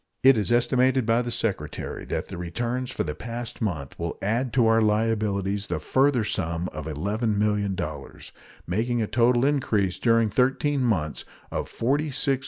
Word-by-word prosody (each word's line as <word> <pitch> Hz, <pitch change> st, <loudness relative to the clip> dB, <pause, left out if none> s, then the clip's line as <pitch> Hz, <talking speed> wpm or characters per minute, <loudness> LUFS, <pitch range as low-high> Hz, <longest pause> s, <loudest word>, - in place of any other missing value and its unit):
It 135 Hz, 0 st, +8 dB
is 105 Hz, -3 st, -1 dB
estimated 130 Hz, +1 st, +3 dB
by 115 Hz, +1 st, +3 dB
the 120 Hz, -, -4 dB
Secretary 115 Hz, -4 st, -3 dB
that -, -, -3 dB
the -, -, -6 dB
returns 120 Hz, +9 st, -3 dB
for -, -, -2 dB
the 75 Hz, -, -3 dB
past 115 Hz, +8 st, -6 dB
month 80 Hz, -, -3 dB
will 85 Hz, 0 st, -3 dB
add 115 Hz, +5 st, -1 dB
to 120 Hz, -1 st, +4 dB
our 115 Hz, 0 st, +4 dB
liabilities 105 Hz, -2 st, 0 dB
the -, -, -1 dB
further 135 Hz, -3 st, +2 dB
sum 85 Hz, -4 st, -2 dB
of 80 Hz, 0 st, -7 dB
$11,000,000, 100 Hz, -, -2 dB, 0.3 s
making 115 Hz, +7 st, 0 dB
a -, -, 0 dB
total 120 Hz, +3 st, +3 dB
increase 110 Hz, -10 st, +1 dB
during 115 Hz, -2 st, +3 dB
thirteen 135 Hz, +4 st, +1 dB
months 80 Hz, -11 st, 0 dB, 0.3 s
of -, -, -3 dB
$46,500,000. 140 Hz, +1 st, 0 dB
115 Hz, 155 wpm, -25 LUFS, 100-125 Hz, 0.3 s, It